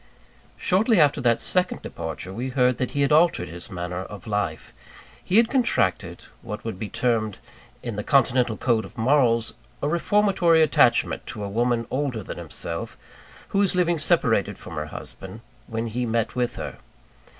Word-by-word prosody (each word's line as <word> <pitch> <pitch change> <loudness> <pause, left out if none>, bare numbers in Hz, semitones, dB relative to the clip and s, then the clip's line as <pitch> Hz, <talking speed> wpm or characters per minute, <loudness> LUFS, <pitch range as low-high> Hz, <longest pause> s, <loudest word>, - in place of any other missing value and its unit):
Shortly 210 +3 +2
after 145 -5 +4
that 120 -2 +3
second 180 0 +1
departure, 85 +3 -6
we 125 +6 -3
heard 125 -1 +2
that 130 - -1
he 145 - -2
had 140 - +1
altered 155 - +3
his 85 +1 -8
manner 90 0 -4
of 105 -3 -10
life. 105 -7 -3 0.5
He 190 - +1
had 230 0 +6
contracted, 110 - 0 0.2
what 105 - -7
would 110 -5 -5
be 110 - -4
termed 115 -3 0 0.5
in 115 -4 -5
the 105 - -2
continental 125 -4 +2
code 115 -3 +1
of 100 +5 -13
morals, 115 -2 +2 0.3
a - - -1
reformatory 175 -1 +3
attachment 155 - +2
to 105 - -6
a 100 - -4
woman 120 +2 0
older 130 -5 -2
than - - -7
himself, 85 0 -5 0.5
who 195 - 0
was 195 -2 +3
living 175 -2 +2
separated 145 - +2
from - - -10
her 75 -1 -4
husband, - - -8 0.3
when 115 +1 -3
he 120 +2 -2
met 115 +1 -1
with 125 -1 -1
her. - - -6
120 Hz, 170 wpm, -24 LUFS, 105-150 Hz, 0.5 s, had